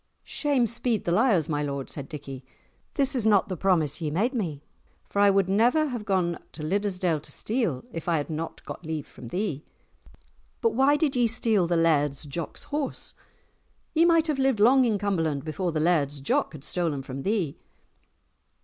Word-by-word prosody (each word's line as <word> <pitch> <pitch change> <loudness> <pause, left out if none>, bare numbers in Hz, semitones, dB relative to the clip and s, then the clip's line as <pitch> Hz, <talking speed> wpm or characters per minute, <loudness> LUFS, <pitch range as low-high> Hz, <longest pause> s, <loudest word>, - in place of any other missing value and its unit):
"Shame 280 -5 +1
speed 235 -1 -1
the 170 - 0
liars, 195 - +3
my 150 -2 -1
lord," 140 -2 -3
said 140 -2 -6
Dickie, 140 -4 -8 0.5
"this 275 -2 +2
was 240 -5 +1
not 205 -1 +4
the 185 - -2
promise 165 -5 +1
ye 155 - -1
made 210 - 0
me, 165 - -3 0.4
for 200 - -3
I 205 0 +6
would 195 -2 +3
never 245 +10 +3
have 240 -5 -5
gone 180 -4 0
to 155 - -6
Liddesdale 180 -2 0
to - - -9
steal 220 - -1
if 165 -1 -5
I 165 - +3
had 145 - -2
not 160 +1 -5
got - - -8
leave 155 -2 -4
from 120 - -12
thee." 170 - -3 1.0
"But 460 - +2
why 275 +2 +4
did 295 -3 0
ye 245 -1 +3
steal 220 -5 +2
the 170 0 +1
Laird's 150 -4 +2
Jock's 155 +3 -6
horse? 290 -1 -4 0.8
Ye 325 - +4
might 330 -2 +4
have 300 -4 -1
lived 265 -5 +2
long 255 +5 +6
in 220 -3 +1
Cumberland 165 -8 -1
before 165 +3 -2
the 155 - -1
Laird's 150 -4 +1
Jock 135 - 0
had 145 -3 -10
stolen 160 -6 -2
from 135 +1 -6
thee." 190 -5 -1
185 Hz, 185 wpm, -26 LUFS, 155-235 Hz, 1.0 s, I